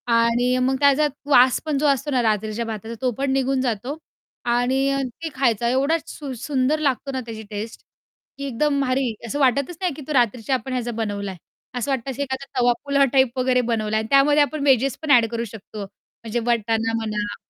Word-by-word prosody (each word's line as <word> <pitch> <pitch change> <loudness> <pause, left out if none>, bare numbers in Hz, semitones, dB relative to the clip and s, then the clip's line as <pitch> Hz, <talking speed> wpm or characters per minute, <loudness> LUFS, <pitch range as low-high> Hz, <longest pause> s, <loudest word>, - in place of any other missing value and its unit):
आणि 240 +2 +2
मग 265 +1 +2
त्याचा 285 +1 +4 0.2
वास 255 -1 +6
पण 300 -3 0
जो 300 - 0
असतो 280 +1 +1
ना 255 -2 +2
रात्रीच्या 220 +1 -1
भाताचा 220 +1 -6
तो 255 -1 +1
पण 275 -1 0
निघून 270 0 +1
जातो 250 +4 -2 0.6
आणि 245 +2 +1 0.4
ते 325 - -2
खायचा 235 -3 +1
एवढा 275 +6 +2
सुं 280 -4 -7
सुंदर 285 +1 +1
लागतो 275 -2 -1
ना 260 -1 -3
त्याची 220 -1 -7
टेस्ट. 215 +2 -6 0.6
की 280 - -5
एकदम 280 +2 0
भारी. 255 -2 0
असं 285 - -3
वाटतच 280 +5 +1
नाही, 360 -5 0
की 300 - -10
तो 305 - -3
रात्रीच्या 245 0 +1
आपण 255 +2 -4
ह्याचा 240 -1 -2
बनवला 205 -3 -3
आहे. 185 - -10 0.4
असं 245 +4 -1
वाटतं 265 0 -2
असं 270 +3 -5
एखादा 265 0 -4
तवा 245 0 +4
पुलाव 280 -1 +3
टाईप 265 -2 +3
वगैरे 250 0 +3
बनवला 220 -2 -1
आहे 220 - +2
आणि - - -7
त्यामध्ये 290 +2 +5
आपण 295 0 -3
वेजेस 270 0 +3
पण 310 -2 -1
ॲड 240 -3 +7
करू 230 0 -2
शकतो. 215 -1 -8
म्हणजे 225 +4 -7
वटाना 225 -1 +1
म्हणा 210 -2 -3
255 Hz, 200 wpm, -22 LUFS, 230-275 Hz, 0.6 s, ॲड